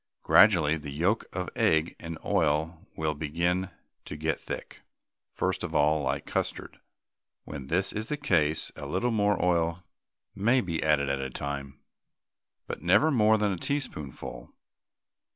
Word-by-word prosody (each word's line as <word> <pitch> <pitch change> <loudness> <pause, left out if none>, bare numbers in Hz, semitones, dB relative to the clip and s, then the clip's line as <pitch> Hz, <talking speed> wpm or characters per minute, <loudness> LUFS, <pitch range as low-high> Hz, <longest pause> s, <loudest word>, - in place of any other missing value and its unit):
Gradually 85 -8 +5
the 75 -1 -8
yolk 85 +10 0
of 90 0 -3
egg 80 +1 +2
and 80 -1 -6
oil 80 +2 0
will 80 -1 -1
begin 85 +5 -1 0.4
to - - -6
get 80 +1 -1
thick, - - -7 0.5
first - - -2
of - - -5
all 75 +1 +3
like 65 - -2
custard. - - -3 0.6
When 70 -3 -8
this 90 +6 0
is 110 +1 -3
the 150 - -1
case 80 - +1
a - - -7
little 95 +7 0
more 105 -3 +2
oil 85 0 +1 0.5
may 115 +6 +3
be 85 -8 -2
added 75 -2 +2
at 70 0 -1
a 65 - -3
time, 70 +1 -5 0.9
but - - -6
never 100 - +4
more 110 -4 +4
than 105 -1 +1
a 95 - -2
teaspoonful. 125 - -5
85 Hz, 150 wpm, -28 LUFS, 75-100 Hz, 0.9 s, Gradually